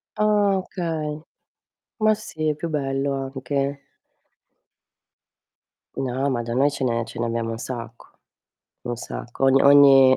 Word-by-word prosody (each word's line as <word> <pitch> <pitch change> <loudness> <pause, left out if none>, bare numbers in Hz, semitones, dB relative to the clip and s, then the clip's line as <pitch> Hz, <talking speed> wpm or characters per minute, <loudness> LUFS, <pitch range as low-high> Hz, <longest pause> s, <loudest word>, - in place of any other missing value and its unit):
Ah, 210 -2 +3
okay. 160 -5 -4 0.8
Ma 215 0 +4
sì 160 -7 -5
è 150 - 0
più 170 - -4
bello 140 -2 -1
anche. 135 +1 -3 2.0
No, 135 +2 -1
ma 120 -3 -1
da 115 - -4
noi 135 +4 +3
ce 140 - -4
ne 115 -2 0
ce 115 - -10
ne 120 - 0
abbiamo 115 0 -2
un 115 - -4
sacco. 120 -1 -7 0.8
Un 120 0 -4
sacco. 120 +2 -5
Ogni 135 0 +5
ogni 135 -2 +7
135 Hz, 135 wpm, -23 LUFS, 125-150 Hz, 2.0 s, ogni